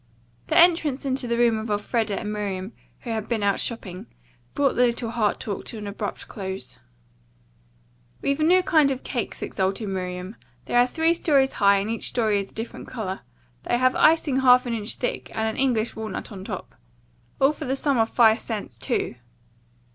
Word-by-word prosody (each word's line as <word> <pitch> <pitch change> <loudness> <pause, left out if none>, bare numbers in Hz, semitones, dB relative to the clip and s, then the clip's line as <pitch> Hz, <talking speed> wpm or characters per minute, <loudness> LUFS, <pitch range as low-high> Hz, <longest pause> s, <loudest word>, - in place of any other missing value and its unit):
The - - +1
entrance 330 -6 +4
into 260 -1 -1
the 235 0 0
room 235 -2 +3
of 220 +1 -5
Elfreda 210 0 -1
and 210 -1 -4
Miriam, 200 -1 -4 0.3
who 235 - -5
had 220 -2 -3
been 225 -3 0
out 200 -1 +2
shopping, 190 -6 -5 0.5
brought 280 -2 +2
the 250 0 +4
little 235 -1 -2
heart 215 -4 0
talk 205 -3 -4
to 230 - -5
an 210 - -6
abrupt 205 0 -5
close. 190 -1 -7 1.4
"We've 280 +1 0
a - - +2
new 365 +3 +5
kind 310 -5 +4
of 265 -1 -3
cakes," 240 -6 -4
exulted 195 +3 -1
Miriam. 185 +1 -4 0.3
"They - - -6
are 245 +1 +5
three 325 +5 +2
stories 280 -5 +2
high 200 -1 +4
and 195 +1 -1
each 230 - -2
story 215 -4 +1
is 195 - -5
a - - -23
different 225 +1 -6
color. 200 -6 -4 0.4
They 240 - 0
have 255 +1 +3
icing 310 -4 +4
half 250 -1 +6
an 240 - -2
inch 220 0 -1
thick 245 - -3
and 220 0 0
an 220 - -3
English 240 -4 +1
walnut 220 -2 -5
on 190 -2 -8
top. - - -6 0.7
All 270 +2 +5
for 305 0 -7
the 265 +1 0
small 280 +1 +1
sum - - +1
of 225 - +1
five 225 -2 +5
cents, 205 - -5
too." 120 - -2
230 Hz, 195 wpm, -24 LUFS, 205-260 Hz, 1.4 s, half